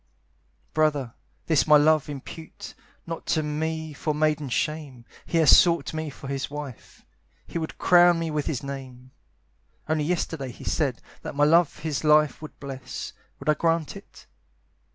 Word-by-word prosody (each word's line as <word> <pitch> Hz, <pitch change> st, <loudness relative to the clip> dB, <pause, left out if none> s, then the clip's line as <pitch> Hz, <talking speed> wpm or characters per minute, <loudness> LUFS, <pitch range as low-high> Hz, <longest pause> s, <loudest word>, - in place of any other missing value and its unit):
Brother, 145 Hz, -6 st, +1 dB, 0.3 s
this 160 Hz, -2 st, +2 dB
my 150 Hz, -1 st, +8 dB
love 155 Hz, 0 st, +3 dB
impute 145 Hz, +3 st, -9 dB, 0.3 s
Not 165 Hz, 0 st, -6 dB
to 155 Hz, -, +1 dB
me 160 Hz, +1 st, -3 dB
for 150 Hz, +1 st, -2 dB
maiden 150 Hz, -2 st, 0 dB
shame; 140 Hz, -2 st, -3 dB, 0.2 s
He 170 Hz, -, 0 dB
has 160 Hz, -3 st, +8 dB
sought 170 Hz, -2 st, +3 dB
me 155 Hz, -1 st, -3 dB
for 140 Hz, -, -10 dB
his 135 Hz, -1 st, -3 dB
wife, 145 Hz, -4 st, -9 dB, 0.4 s
He 170 Hz, -, -4 dB
would 160 Hz, -, -5 dB
crown 175 Hz, -1 st, +5 dB
me 165 Hz, -1 st, -2 dB
with 150 Hz, -1 st, -2 dB
his 140 Hz, -5 st, -2 dB
name. 130 Hz, -2 st, -8 dB, 0.8 s
Only 155 Hz, -1 st, 0 dB
yesterday 160 Hz, -5 st, -2 dB
he -, -, -13 dB
said 135 Hz, -6 st, -1 dB, 0.2 s
That -, -, -7 dB
my 145 Hz, -, +2 dB
love 165 Hz, +2 st, +4 dB
his 155 Hz, -2 st, -2 dB
life 150 Hz, -2 st, +4 dB
would 155 Hz, -, -10 dB
bless: 135 Hz, -2 st, -7 dB, 0.3 s
Would -, -, -10 dB
I -, -, +6 dB
grant 165 Hz, 0 st, 0 dB
it? -, -, -14 dB
150 Hz, 160 wpm, -25 LUFS, 140-160 Hz, 0.8 s, my